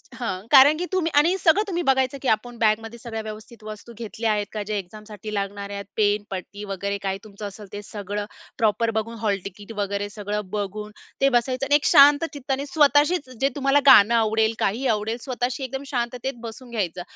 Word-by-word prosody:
हां, 195 Hz, -5 st, -4 dB
कारण 285 Hz, +2 st, +8 dB
की 360 Hz, -, -2 dB
तुम्ही 340 Hz, -4 st, 0 dB
आणि 340 Hz, +5 st, +3 dB
सगळं 380 Hz, +3 st, +4 dB
तुम्ही 350 Hz, -2 st, -1 dB
बघायचं, 265 Hz, 0 st, +2 dB
की 270 Hz, -, -3 dB
आपण 235 Hz, +2 st, -1 dB
बॅगमध्ये 225 Hz, +1 st, 0 dB
सगळ्या 225 Hz, -2 st, -5 dB
व्यवस्थित 215 Hz, +1 st, -10 dB
वस्तू 215 Hz, +2 st, -9 dB
घेतल्या 225 Hz, -1 st, -2 dB
आहेत 205 Hz, -1 st, 0 dB
का? 215 Hz, -, -4 dB
जे 215 Hz, -, -1 dB
एक्झामसाठी 210 Hz, +2 st, -8 dB
लागणार 200 Hz, 0 st, -3 dB
आहेत. 200 Hz, 0 st, -6 dB
पेन, 205 Hz, -1 st, +2 dB
पट्टी 195 Hz, +2 st, -7 dB
वगैरे 200 Hz, 0 st, -3 dB
काय 195 Hz, 0 st, -1 dB
तुमचं 205 Hz, 0 st, -8 dB
असेल 200 Hz, +1 st, -11 dB
ते 205 Hz, -, -5 dB
सगळं 205 Hz, 0 st, -5 dB, 0.3 s
प्रॉपर 225 Hz, 0 st, +1 dB
बघून, 230 Hz, +2 st, -3 dB
हॉल 205 Hz, -3 st, 0 dB
तिकीट 205 Hz, +3 st, -9 dB
वगैरे 200 Hz, 0 st, -2 dB
सगळं 210 Hz, 0 st, -4 dB
बघून 210 Hz, +1 st, -4 dB, 0.3 s
ते 275 Hz, -, +5 dB
बसायचं. 255 Hz, +2 st, 0 dB
आणि 290 Hz, -, +3 dB
एक 290 Hz, -, +2 dB
शांत 290 Hz, 0 st, +7 dB
चित्ताने 275 Hz, 0 st, -3 dB
स्वतःशीच 290 Hz, +1 st, +3 dB
जे 275 Hz, -, +3 dB
तुम्हाला 275 Hz, 0 st, +3 dB
गाणं 225 Hz, -2 st, +8 dB
आवडेल, 220 Hz, 0 st, +2 dB
काही 235 Hz, +7 st, 0 dB
आवडेल, 220 Hz, +3 st, -3 dB
स्वतःशी 250 Hz, 0 st, -3 dB
एकदम 270 Hz, +2 st, -5 dB
शांततेत 245 Hz, +1 st, -2 dB
बसून 240 Hz, +2 st, -10 dB
घ्यायचं, 185 Hz, -6 st, -2 dB
225 Hz, 190 wpm, -23 LUFS, 205-265 Hz, 0.3 s, कारण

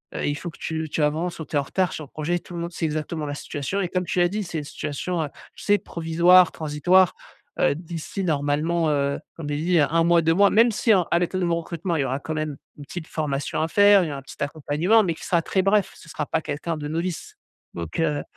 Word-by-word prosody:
heu, -, -, -3 dB
il 145 Hz, -, 0 dB
faut 175 Hz, +3 st, -6 dB
que -, -, -18 dB
tu 160 Hz, -1 st, -3 dB
tu 155 Hz, -, -2 dB
avances» 165 Hz, +4 st, -1 dB
ou 160 Hz, -, -5 dB
«Tu -, -, -7 dB
es -, -, +4 dB
en -, -, -1 dB
retard 185 Hz, +5 st, 0 dB
sur 155 Hz, -, -5 dB
le -, -, -20 dB
projet». 165 Hz, +3 st, -1 dB
Tout 175 Hz, -, -13 dB
le -, -, -4 dB
monde 170 Hz, +1 st, -4 dB
sait 165 Hz, -, -2 dB
exactement 155 Hz, 0 st, -3 dB
la 145 Hz, -, -4 dB
situation 145 Hz, +7 st, -3 dB
et 180 Hz, -, 0 dB
comme 180 Hz, 0 st, -1 dB
tu 180 Hz, -, -1 dB
l'as 175 Hz, -, +5 dB
dit, 210 Hz, +3 st, -2 dB
c'est 170 Hz, -3 st, -4 dB
une -, -, -5 dB
situation, 155 Hz, +4 st, -3 dB
heu, 150 Hz, -, -4 dB, 0.3 s
tu -, -, -11 dB
sais, 205 Hz, 0 st, +4 dB
provisoire, 170 Hz, +1 st, +4 dB
transitoire, 170 Hz, +4 st, +3 dB, 0.4 s
heu, -, -, +3 dB
d'ici 170 Hz, +4 st, -5 dB
normalement, 155 Hz, +1 st, +1 dB
heu, 140 Hz, -1 st, 0 dB, 0.2 s
comme 150 Hz, -3 st, -6 dB
j'ai 145 Hz, -, -1 dB
dit 170 Hz, +3 st, +2 dB
1 160 Hz, +3 st, +3 dB
mois, 170 Hz, 0 st, +5 dB
2 165 Hz, 0 st, +3 dB
mois, 200 Hz, +2 st, +5 dB
même 230 Hz, +2 st, +5 dB
si 220 Hz, +1 st, +3 dB
en 185 Hz, -3 st, +4 dB
à 170 Hz, -, +4 dB
l'état 180 Hz, +2 st, -1 dB
de 180 Hz, -, +1 dB
mon 170 Hz, -1 st, +1 dB
recrutement, 170 Hz, +1 st, -3 dB
il -, -, +1 dB
y -, -, 0 dB
aura 135 Hz, +1 st, -2 dB
quand 155 Hz, -, -5 dB
même 155 Hz, -2 st, -3 dB, 0.2 s
une 145 Hz, -, -10 dB
petite 160 Hz, +2 st, -7 dB
formation 145 Hz, -2 st, -2 dB
à 160 Hz, -, +1 dB
faire, 205 Hz, 0 st, +6 dB
il -, -, -2 dB
y -, -, -4 dB
aura 140 Hz, -, -5 dB
un -, -, -14 dB
petit 135 Hz, -, -13 dB
accompagnement, 155 Hz, +9 st, +2 dB
mais 170 Hz, -4 st, -1 dB
qui -, -, -10 dB
sera 170 Hz, -2 st, +2 dB
très 190 Hz, -, +1 dB
bref, 200 Hz, 0 st, +2 dB
ce 165 Hz, -, -15 dB
sera 150 Hz, -1 st, -3 dB
pas -, -, 0 dB
quelqu'un 155 Hz, +3 st, -3 dB
de 150 Hz, -1 st, -5 dB
novice. 165 Hz, +2 st, -4 dB, 0.4 s
Donc 85 Hz, -, -5 dB
heu 150 Hz, -3 st, 0 dB
165 Hz, 270 wpm, -24 LUFS, 150-180 Hz, 0.4 s, faire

